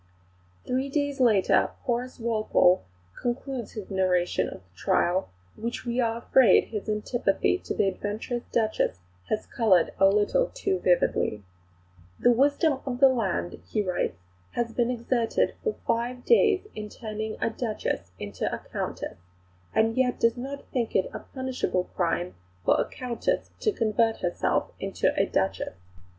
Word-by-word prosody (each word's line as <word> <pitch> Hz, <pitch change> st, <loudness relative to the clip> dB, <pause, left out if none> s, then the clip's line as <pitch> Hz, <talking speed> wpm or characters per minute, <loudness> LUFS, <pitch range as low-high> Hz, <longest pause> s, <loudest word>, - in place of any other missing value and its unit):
Three 260 Hz, +2 st, -1 dB
days 285 Hz, -1 st, -1 dB
later 220 Hz, -7 st, +4 dB
Horace 250 Hz, +1 st, -2 dB
Walpole 215 Hz, -5 st, +3 dB, 0.4 s
concludes 245 Hz, -1 st, -3 dB
his 210 Hz, -2 st, -7 dB
narrative 180 Hz, -, +1 dB
of -, -, -8 dB
the 90 Hz, 0 st, -32 dB
trial, 175 Hz, -, +1 dB, 0.3 s
which 235 Hz, +3 st, -4 dB
we 240 Hz, +1 st, -1 dB
are 230 Hz, -1 st, 0 dB
afraid 245 Hz, +1 st, +5 dB
his 215 Hz, -1 st, -4 dB
antipathy 210 Hz, -, +1 dB
to -, -, -5 dB
the 195 Hz, -, +2 dB
adventurous 210 Hz, +5 st, -3 dB
Duchess 220 Hz, -, +1 dB, 0.3 s
has 215 Hz, -, -1 dB
coloured 190 Hz, -8 st, +3 dB
a 195 Hz, -, +7 dB
little 210 Hz, -, +3 dB
too 390 Hz, -6 st, 0 dB
vividly: 140 Hz, -, +1 dB, 0.8 s
"The 245 Hz, -, +5 dB
wisdom 285 Hz, +3 st, +3 dB
of 250 Hz, -2 st, -4 dB
the 270 Hz, -1 st, +8 dB
land," 205 Hz, -8 st, -1 dB
he 215 Hz, -, 0 dB
writes, 180 Hz, -, -1 dB, 0.4 s
"has 235 Hz, -1 st, -1 dB
been 240 Hz, 0 st, +1 dB
exerted 235 Hz, -1 st, 0 dB
for 445 Hz, -2 st, 0 dB
five 245 Hz, +2 st, -1 dB
days 420 Hz, -4 st, +4 dB
in 210 Hz, -1 st, -6 dB
turning 215 Hz, -1 st, -5 dB
a -, -, 0 dB
Duchess 220 Hz, -, -3 dB
into 100 Hz, -1 st, -3 dB
a -, -, -2 dB
Countess, -, -, -5 dB, 0.5 s
and 225 Hz, +1 st, +2 dB
yet 255 Hz, -1 st, +1 dB
does 230 Hz, 0 st, +3 dB
not 275 Hz, +3 st, -6 dB
think 240 Hz, -3 st, -1 dB
it 190 Hz, -, +2 dB
a -, -, -4 dB
punishable 260 Hz, -8 st, -2 dB
crime 175 Hz, 0 st, 0 dB, 0.3 s
for -, -, +5 dB
a -, -, 0 dB
Countess 255 Hz, -, -2 dB
to 430 Hz, -, +2 dB
convert 225 Hz, -, +1 dB
herself 175 Hz, -1 st, 0 dB
into -, -, 0 dB
a -, -, +2 dB
Duchess. 95 Hz, -1 st, -1 dB
230 Hz, 150 wpm, -27 LUFS, 195-255 Hz, 0.8 s, the